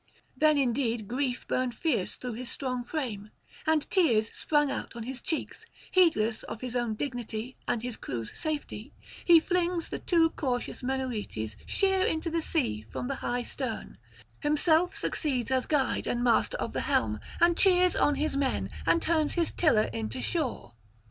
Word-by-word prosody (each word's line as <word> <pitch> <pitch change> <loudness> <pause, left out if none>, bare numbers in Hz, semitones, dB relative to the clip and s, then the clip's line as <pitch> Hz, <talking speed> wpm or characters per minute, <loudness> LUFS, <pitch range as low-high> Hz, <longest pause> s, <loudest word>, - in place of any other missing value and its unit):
Then 305 -1 +4
indeed 240 -4 0
grief 250 +1 -2
burned 255 -2 0
fierce 255 - 0
through 250 -2 -5
his 245 +2 -5
strong 255 -3 -3
frame, 235 -8 -4 0.4
and 315 -2 +2
tears 235 - +3
sprung 295 -2 +1
out - - -5
on 235 - -5
his 260 +2 -6
cheeks; 320 - -3 0.2
heedless 235 -12 +3
of 220 - -7
his 250 -1 -4
own 240 -3 0
dignity 245 -1 -4
and 230 - 0
his 245 -2 -4
crew's 115 -3 -5
safety, 310 -2 -4 0.3
he 340 -2 +8
flings 350 0 0
the - - -4
too 330 -2 +3
cautious 250 -4 -3
Menoetes 245 - -3
sheer 385 -1 +2
into 320 0 -1
the 330 0 0
sea 260 - 0
from 245 - -4
the 275 - -1
high 245 0 -1
stern, - - -5 0.4
himself 315 +4 +2
succeeds 265 -5 -1
as 260 -1 +1
guide 290 -3 +1
and 240 0 0
master 240 -2 +3
of - - -3
the - - -1
helm, - - +1 0.2
and 340 0 +5
cheers 365 -1 +4
on 290 - +3
his 305 0 -1
men, 275 -2 0 0.2
and 335 - +4
turns 315 -2 +1
his 340 -2 +1
tiller 265 -11 +3
in 110 -2 -3
to 125 - -5
shore. 275 - -2
265 Hz, 170 wpm, -29 LUFS, 235-320 Hz, 0.4 s, he